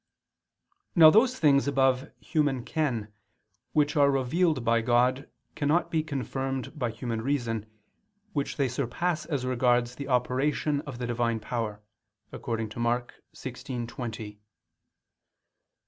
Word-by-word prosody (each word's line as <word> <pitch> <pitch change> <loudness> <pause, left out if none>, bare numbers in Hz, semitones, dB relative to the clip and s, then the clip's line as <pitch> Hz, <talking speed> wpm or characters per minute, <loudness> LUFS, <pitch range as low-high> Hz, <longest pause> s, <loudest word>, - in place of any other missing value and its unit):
Now 160 -3 +9
those 250 +6 +4
things 140 -3 +4
above 135 0 +2
human 145 -6 0
ken 120 -9 -2 0.6
which 150 +1 +2
are 140 -2 +5
revealed 140 +1 +1
by 115 0 +3
God 125 +3 +2 0.2
cannot 150 +4 +1
be 160 - +2
confirmed 135 -3 -3
by 120 -3 0
human 115 0 -4
reason, 115 -5 -1 0.7
which 140 -4 -2
they 140 - +2
surpass 155 +6 -2
as 140 -6 -2
regards 125 -1 +2
the 140 +2 -7
operation 140 +3 +1
of 130 -4 -6
the 125 - -3
Divine 115 -1 0
power, 110 -2 -4 0.5
according 115 -2 -3
to 110 - -9
Mk. 120 +1 0 0.2
16:20, 120 -2 -5
"They 105 -1 -9
130 Hz, 125 wpm, -28 LUFS, 120-145 Hz, 0.7 s, Now